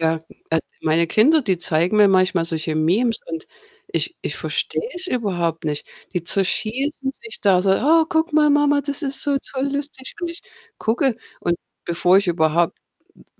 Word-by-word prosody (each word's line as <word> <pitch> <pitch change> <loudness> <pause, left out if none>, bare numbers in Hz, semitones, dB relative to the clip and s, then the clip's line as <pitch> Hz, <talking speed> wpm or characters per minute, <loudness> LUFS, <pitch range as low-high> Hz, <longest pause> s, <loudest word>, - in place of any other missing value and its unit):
Ja, 160 0 +1 0.3
also, 160 0 +1 0.2
meine 165 +2 +2
Kinder, 295 - +4
die 195 -7 0
zeigen 170 +4 +1
mir 210 -1 +7
manchmal 185 -3 +2
solche 160 -1 -2
Memes 200 +10 +1
und 165 -1 -6 0.4
ich - - -2
ich - - -4
verstehe - - -2
es 360 +1 0
überhaupt 175 - -2
nicht. 150 -1 -3 0.3
Die 180 -3 -2
zerschießen 255 - +1
sich 435 +9 -5
da 185 -3 +3
so: 195 - +2
„Oh, 315 +11 +4
guck 320 +1 0
mal, 300 -1 +5
Mama, 290 0 +3
das 285 +2 -1
ist 275 -1 +1
so 285 -1 +1
toll 275 0 -4
lustig." 285 -2 -4
Und 345 -1 -3
ich 335 - -10 0.4
gucke 240 +2 0 0.2
und 170 0 0 0.3
bevor 175 +2 +4
ich 200 - -1
überhaupt 165 0 +1 0.4
m - - -20
200 Hz, 175 wpm, -21 LUFS, 170-280 Hz, 0.4 s, mir